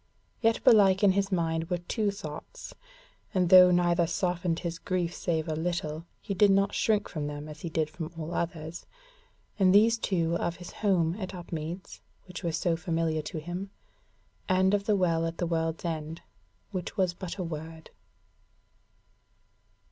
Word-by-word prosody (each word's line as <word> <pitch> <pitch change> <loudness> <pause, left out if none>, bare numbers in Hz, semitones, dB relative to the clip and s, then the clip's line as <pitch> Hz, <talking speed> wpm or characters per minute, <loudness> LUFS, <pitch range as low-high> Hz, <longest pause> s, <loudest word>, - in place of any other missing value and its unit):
Yet 225 -1 +2
belike 195 -3 +6
in 200 - +7
his 195 +1 0
mind 165 -2 0
were 180 - 0
two 205 +5 -1
thoughts, 200 - -8 0.6
and 180 -2 +2
though 180 -1 +9
neither 175 -1 +3
softened 175 0 -1
his 170 -2 -4
grief 180 -2 -1
save 160 -2 -2
a 155 - -1
little, 165 -1 -3
he 200 - -4
did 205 +2 +5
not 195 +1 +3
shrink 210 -2 +1
from 150 -2 -4
them 145 0 -6
as 150 0 -10
he 170 - -4
did 160 -1 0
from 160 +1 -7
all 160 +1 -5
others; 165 -1 -4 0.7
and 190 0 +5
these 225 +2 +5
two 170 -6 0
were 170 - 0
of 170 0 -1
his 175 0 -10
home 180 -5 +1
at 190 -1 -5
Upmeads, 170 0 -6 0.2
which 180 -2 -8
was 165 -2 -1
so 170 -2 +1
familiar 165 -2 -1
to 155 - -6
him, 175 +5 -5 0.8
and 190 +1 +3
of 200 -1 +1
the 215 - +3
Well 170 -4 +1
at 165 - -5
the 175 - -1
World's 165 0 -2
End, 160 -1 -4 0.5
which 185 +1 -5
was 185 -3 +2
but 185 +1 -7
a 185 - -2
word. 160 0 -7
175 Hz, 170 wpm, -28 LUFS, 165-190 Hz, 0.8 s, though